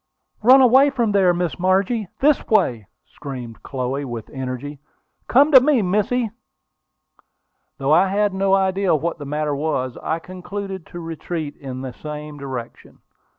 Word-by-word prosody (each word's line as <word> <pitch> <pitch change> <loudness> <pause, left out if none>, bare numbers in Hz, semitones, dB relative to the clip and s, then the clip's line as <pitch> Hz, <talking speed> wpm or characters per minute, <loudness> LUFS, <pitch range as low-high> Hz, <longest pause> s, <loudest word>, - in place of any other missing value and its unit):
"Run 255 +5 +7
away 260 +3 +6
from 240 -6 0
there, 195 -3 +4
Miss 175 0 -2
Margie! 190 +4 +1
This 290 +1 +3
way!" 120 - +1 0.2
screamed 125 -5 -9
Chloe, 135 +1 -3
with 120 -5 -7
energy. 130 +2 -6 0.5
"Come 285 +5 +4
to 260 -3 +9
me, 265 -5 +3
missy!" 210 +5 0 1.5
Though 140 +2 +1
I 180 +4 +5
had 205 +1 +1
no 195 0 +2
idea 190 -2 +1
what 165 +2 -2
the 145 - -7
matter 150 +1 -2
was, 140 -4 -2
I 160 - -1
concluded 185 +1 -7
to 175 - -9
retreat 165 -2 -5
in 130 -2 -7
the 130 -2 -6
same 150 +1 -8
direction. 130 -4 -8
175 Hz, 150 wpm, -21 LUFS, 140-200 Hz, 1.5 s, to